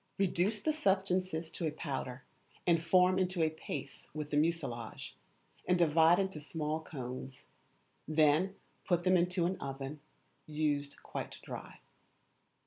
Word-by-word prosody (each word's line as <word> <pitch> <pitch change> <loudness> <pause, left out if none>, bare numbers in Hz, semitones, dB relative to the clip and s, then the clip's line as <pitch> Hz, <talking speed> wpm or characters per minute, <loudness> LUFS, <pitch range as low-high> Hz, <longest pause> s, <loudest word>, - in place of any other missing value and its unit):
Reduce 195 +2 +1
the 310 - +2
substances 185 - +1
to 165 - -2
a - - -1
powder, 135 -4 -4 0.4
and 170 -2 +3
form 180 +2 +5
into 185 -2 +1
a 155 - +2
paste 160 - -7
with 150 -1 -4
the - - 0
mucilage, 145 -8 -1 0.5
and 180 - +4
divide 165 0 +5
into 190 -5 -1
small 155 0 -2
cones; 130 -3 -7 0.6
then 155 +5 +3 0.3
put 175 -2 +1
them 185 0 +4
into 180 0 +2
an 185 +2 0
oven, 135 +2 -5 0.5
used 150 -2 -1
quite - - -5
dry. - - -8
160 Hz, 135 wpm, -33 LUFS, 150-185 Hz, 0.6 s, form